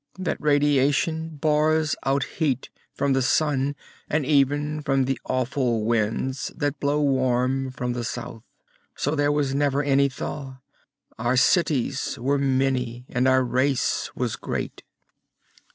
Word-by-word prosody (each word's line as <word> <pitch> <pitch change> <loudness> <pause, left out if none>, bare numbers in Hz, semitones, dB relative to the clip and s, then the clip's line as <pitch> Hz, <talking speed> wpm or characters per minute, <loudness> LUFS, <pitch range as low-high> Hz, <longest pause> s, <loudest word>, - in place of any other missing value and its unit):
That 185 -2 -3
radiation 145 +2 +2
bars 155 +1 +2
out 135 0 +2
heat, 140 -6 -2 0.2
from 140 -1 0
the 135 - +2
Sun, 140 +1 +1 0.3
and 150 -2 0
even 145 +1 +1
from 135 -2 +1
the 135 0 -1
awful 125 -3 0
winds 115 +4 -1
that 145 -2 -1
blow 145 +1 +1
warm 130 -1 +1
from 125 -1 -3
the 120 -1 -3
south. 115 -1 -6 0.5
So 145 - -1
there 145 -1 +2
was 145 -2 0
never 140 0 +1
any 140 0 +3
thaw. 135 0 -6 0.6
Our 120 +3 +1
cities 145 -2 +1
were 140 +4 0
many, 130 -3 0
and 125 +1 +1
our 130 0 +4
race 130 +2 0
was 125 -3 -2
great. - - -4
135 Hz, 135 wpm, -24 LUFS, 130-145 Hz, 0.6 s, our